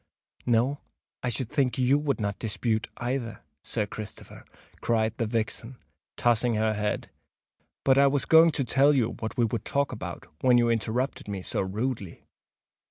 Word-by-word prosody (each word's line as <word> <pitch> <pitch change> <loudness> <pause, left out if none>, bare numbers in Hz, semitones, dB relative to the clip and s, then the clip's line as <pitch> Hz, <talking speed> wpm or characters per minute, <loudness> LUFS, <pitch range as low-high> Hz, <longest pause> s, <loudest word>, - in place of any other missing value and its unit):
"No—I 125 +1 -2
should 120 0 -2
think 135 -5 +1
you 130 +3 +3
would 145 -3 -1
not 100 -2 -2
dispute, 110 0 -1
either, 120 -3 -3 0.2
Sir 110 -3 -1
Christopher!" 105 +1 -9 0.4
cried 110 -1 +1
the 115 - -1
vixen, 115 +2 -3 0.4
tossing 120 0 +2
her 110 0 +1
head. 105 0 -2 0.7
"But 135 0 +4
I 140 - +6
was 140 0 +1
going 165 +1 +7
to 135 - 0
tell 140 +3 +4
you 120 -4 +2
what 110 - -5
we 120 - +4
would 115 -1 -3
talk 140 0 0
about, 90 -8 -6 0.2
when 125 -1 +5
you 120 -1 +3
interrupted 115 +4 -1
me 100 -2 -4
so - - -1
rudely. 100 0 -3
120 Hz, 160 wpm, -27 LUFS, 110-130 Hz, 0.7 s, going